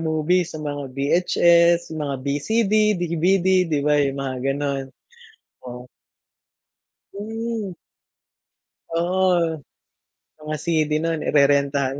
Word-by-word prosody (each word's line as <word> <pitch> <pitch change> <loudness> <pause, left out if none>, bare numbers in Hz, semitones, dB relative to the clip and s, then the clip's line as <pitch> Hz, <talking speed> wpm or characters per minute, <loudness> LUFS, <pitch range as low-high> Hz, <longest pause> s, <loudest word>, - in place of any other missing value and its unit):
movie 160 +3 +1
sa 160 - -9
mga 145 -2 -5
VHS, 170 +3 +3
mga 150 -3 -3
BCD, 200 +10 0 0.2
DVD 175 +2 +1 0.2
'di 150 -3 0
ba 150 - +3
yung 140 -1 -1
mga 135 -1 -4
gano'n? 140 -1 -2 0.8
Oo. 125 +1 -10 1.3
Mm. 220 -1 -5 1.2
Oo. 175 -2 +1 0.8
Mga 155 0 -5
CD 155 -2 0
no'n, 165 -1 -1
irerentahan 140 -1 +2
160 Hz, 95 wpm, -22 LUFS, 140-175 Hz, 1.3 s, VHS